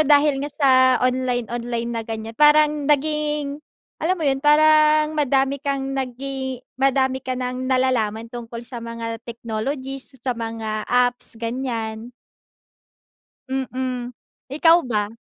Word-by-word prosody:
dahil 290 -2 +4
nga 290 - -3
sa 285 -1 +2 0.3
online-online 245 -2 -1
na 230 - -2
ganiyan, 225 0 -6
parang 300 -1 +5
naging 295 0 0 0.4
alam 355 +4 +1
mo 325 - -4
'yun, 270 -1 +1
parang 305 +1 +5
madami 275 -2 +1
kang 275 -2 -2
nagi 265 0 -4 0.2
madami 265 -1 +2
ka 255 -1 -4
ng 255 +1 -3
nalalaman 230 -4 0
tungkol 235 -1 -7
sa 240 -1 -6
mga 230 -1 -5
technologies, 260 +4 -4
sa 255 - +1
mga 225 -2 -4
apps, 245 -1 +2
ganiyan. 230 -1 -4 1.4
Mm, 255 -2 -3 0.4
ikaw 325 +3 +5
ba? 210 -2 -1
260 Hz, 120 wpm, -22 LUFS, 235-285 Hz, 1.4 s, parang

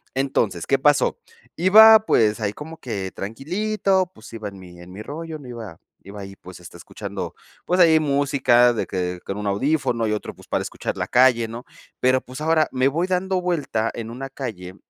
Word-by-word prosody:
Entonces, 115 -10 -1
¿qué 135 -1 +2
pasó? 145 -1 +2 0.4
Iba, 220 +5 +8
pues, 110 0 +2
ahí 105 -1 -1
como 160 +5 -9
que 100 -6 -5
tranquilito, 185 - -1
pues, 110 - -14
iba 110 -2 -6
en 100 -1 -13
mi 90 -1 -13
en 90 +1 -13
mi 105 - -8
rollo 160 +2 -7
no 130 - -12
iba 110 -8 -8 0.3
iba 100 0 -9
ahí, 95 0 -9
pues, 90 -1 -12
está 85 - -12
escuchando, - - -7 0.3
pues, 180 +1 0
ahí 160 -2 +6
música 135 -4 +3
de 110 - -2
que 90 -1 -3
con 100 - -4
un 105 0 -4
audífono 125 +1 0
y - - -1
otro, 105 - -5
pues, - - -17
para - - -1
escuchar - - -5
la - - -2
calle, 125 -2 +4
¿no? 115 +2 -8 0.3
Pero, 130 0 +3
pues, 130 +4 -10
ahora 160 0 +2
me 130 +1 +2
voy 170 +6 -1
dando 185 0 0
vuelta 145 -11 -1
en 115 0 -6
una 135 +3 -7
calle 100 -9 -7
130 Hz, 195 wpm, -22 LUFS, 105-155 Hz, 0.4 s, Iba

